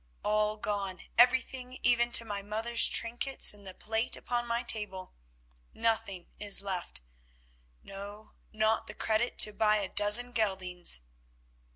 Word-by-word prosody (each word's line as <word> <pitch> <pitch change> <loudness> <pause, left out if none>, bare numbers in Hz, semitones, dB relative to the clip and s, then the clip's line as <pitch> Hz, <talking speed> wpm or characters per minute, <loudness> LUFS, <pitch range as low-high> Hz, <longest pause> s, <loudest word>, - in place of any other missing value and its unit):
All 210 0 0
gone, 200 -4 -4
everything, 255 +1 +1
even 240 0 +2
to 230 - +5
my 205 -2 -4
mother's 220 +3 0
trinkets 240 +3 +3
and 205 -1 -13
the 185 - -7
plate 220 +2 -1
upon 240 0 -4
my 235 +1 -2
table. 195 -4 -1 0.6
Nothing 220 -6 -2
is 200 -1 +3
left, 180 - -4 0.8
no, 205 +2 -10 0.2
not 220 0 0
the 210 - -9
credit 220 +2 -1
to 210 - +4
buy 215 0 +2
a 205 -2 -2
dozen 210 +5 +5
geldings." 185 - -2
215 Hz, 135 wpm, -29 LUFS, 200-235 Hz, 0.8 s, to